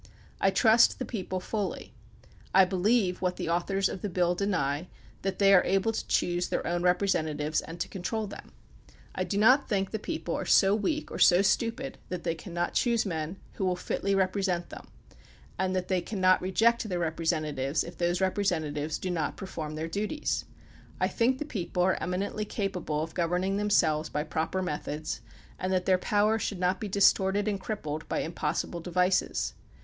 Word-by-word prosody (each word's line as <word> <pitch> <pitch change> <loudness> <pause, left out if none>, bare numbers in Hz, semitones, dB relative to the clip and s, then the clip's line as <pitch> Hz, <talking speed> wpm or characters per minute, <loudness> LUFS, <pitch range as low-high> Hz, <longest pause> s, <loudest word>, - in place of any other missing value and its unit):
I 195 - +4
trust 225 +3 +5
the 255 - -3
people 185 -4 -4
fully. 195 - -4 0.6
I 190 0 +8
believe, 190 +1 +1
what 180 -1 0
the - - -4
authors 190 +3 +1
of 190 - -6
the 205 - -2
bill 175 -1 +1
deny, 175 -5 -1 0.3
that 195 -1 -2
they 195 -1 +5
are 180 - +7
able 195 +4 +1
to 225 - -4
choose 175 0 +1
their - - -1
own 175 0 0
representatives 160 -5 +1
and 165 +1 -9
to - - -1
control 215 +3 -3
them. 200 - -10 0.6
I - - -1
do 200 - -2
not 255 +7 +5
think 195 -3 0
the 220 - -2
people - - -4
are - - -2
so 195 0 +5
weak 260 +9 -1
or - - -5
so 180 +1 +6
stupid 230 +6 0
that 180 -1 -4
they 165 - 0
cannot 175 +1 -4
choose 235 -2 +2
men 165 -1 -3 0.2
who 190 - 0
wiU 180 -1 +1
fitly 195 +2 -1
represent 190 -2 0
them, - - -10 0.7
and 185 0 0
that 185 -1 -1
they 185 -2 +1
cannot 185 -1 +2
reject 225 +5 +2
their 180 - -1
representatives 155 -4 -1
if 170 - -9
those 175 0 0
rep 190 0 0
resentatives 155 -6 -1
do 185 - -3
not 160 -4 -2
perform 160 -6 -6
their 160 +1 -3
duties. 210 - -2 0.5
I - - +2
think 250 +3 +1
the 300 - -4
people 180 - -2
are 185 0 +1
eminently 195 +4 -2
capable 180 -8 -2
of 160 0 -7
governing 180 +3 0
themselves 165 -7 +2
by 150 - -1
proper 160 +4 -2
methods, 150 -5 -4 0.4
and 185 - -2
that 185 -1 +1
their 185 -1 +3
power 210 +3 +2
should 205 - -2
not 185 +1 +1
be 215 - -2
distorted 200 +1 +3
and 200 -2 0
crippled 160 -7 -4
by - - 0
impossible 165 +1 -2
devices. 180 +2 0
185 Hz, 185 wpm, -28 LUFS, 170-200 Hz, 0.7 s, I